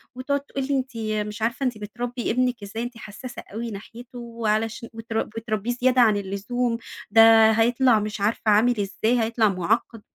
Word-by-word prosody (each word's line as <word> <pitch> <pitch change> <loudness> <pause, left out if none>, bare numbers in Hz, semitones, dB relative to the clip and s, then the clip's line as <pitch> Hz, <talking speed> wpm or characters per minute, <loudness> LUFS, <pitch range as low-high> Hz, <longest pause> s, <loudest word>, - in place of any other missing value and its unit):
وتقعد 280 +3 -1
تقول 275 -1 -5
لي: 280 - +1
"أنتِ 260 -2 -4 0.3
مش 210 +1 -8
عارفة 235 +4 -1
أنتِ 250 -4 -1
بتربّي 240 +3 -4
ابنِك 250 -2 0
إزاي 210 +3 -5
أنتِ 240 -1 -7
حساسة 225 +3 -9
أوي 230 +1 -4
ناحيته 235 +5 -10
وعلشان 230 -1 -2
وترب 225 0 -3
بتربيه 225 0 -3
زيادة 250 +1 +3
عن 215 -3 +4
اللزوم، 230 +5 -2 0.3
ده 225 -1 +7
هيطلع 235 +1 +3
مش 210 -1 -4
عارفة 210 +3 0
عامل 225 +2 +3
إزاي، 215 +5 0
هيطلع 225 -1 +2
معقّد." 210 +4 -1
230 Hz, 165 wpm, -24 LUFS, 215-245 Hz, 0.3 s, ده